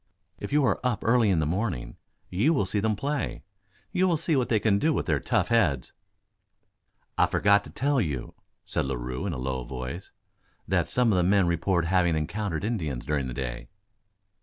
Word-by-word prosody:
If - - -6
you 145 -1 +3
are - - +1
up 125 -4 -1
early 115 -2 +4
in 95 - +3
the 80 - +1
morning 90 - -2 0.4
you 120 - +2
will 100 - +1
see 105 +2 -1
them 110 +1 +1
at - - -5
play 145 +5 -3 0.5
you 185 -1 +2
will 170 -3 +2
see 165 0 0
what 130 -3 +1
they 110 - +3
can 100 -2 +2
do 160 - +2
with - - -1
their - - +1
tough - - 0
heads." 85 - +1 1.3
"I - - +5
forgot 100 0 +3
to - - -10
tell 140 -1 +1
you," 70 - -3 0.3
said - - -1
Larue 65 +6 -3
in 90 - -2
a - - -4
low 65 0 -3
voice, 65 +8 -6 0.6
"that - - +1
some 125 -2 +2
of - - +2
the 90 - +3
men 95 +1 +4
report 85 +1 +1
having 85 -1 +2
encountered 85 +2 -2
Indians 80 - -2
during 70 -3 -1
the 65 - -5
day." 65 -2 -5
95 Hz, 200 wpm, -27 LUFS, 75-115 Hz, 1.3 s, I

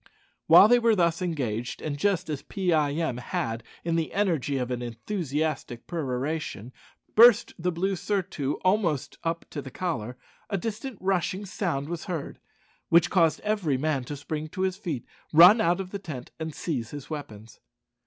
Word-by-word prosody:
While - - +9
they 245 +2 +5
were 230 -2 +3
thus 170 -2 +1
engaged, 125 -10 -2
and 150 -2 -3
just 190 +4 0
as 150 -3 -3
Pee 185 -4 -1
eye 150 -2 +2
em 155 -6 -1
had, 115 -2 -3 0.2
in 165 0 0
the 160 -2 -1
energy 165 -9 0
of 125 -1 -2
an 125 -1 -2
enthusiastic 140 - -3
peroration, 135 - -3 0.4
burst 230 0 +7
the 180 +2 0
blue 190 +3 -1
surtout 175 -7 -2
almost 185 - +1
up 165 0 -2
to 145 - -4
the 135 - -8
collar, 125 -9 -3 0.3
a 200 - 0
distant 225 +4 -5
rushing 190 +1 -1
sound 175 -8 -2
was 170 0 -5
heard, 165 -5 -5 0.5
which 170 0 +5
caused 165 -5 +3
every 205 -10 0
man 145 -1 0
to 145 +3 -6
spring 150 +2 -4
to 185 +4 -6
his 190 -1 +1
feet, 170 - -4 0.3
run 180 +8 +8
out 175 -2 +2
of 190 -1 -5
the 200 - -4
tent, 150 -10 -8
and 160 -1 -5
seize 125 -9 -3
his 145 +1 -9
weapons. 115 -8 -8
160 Hz, 175 wpm, -27 LUFS, 140-185 Hz, 0.5 s, While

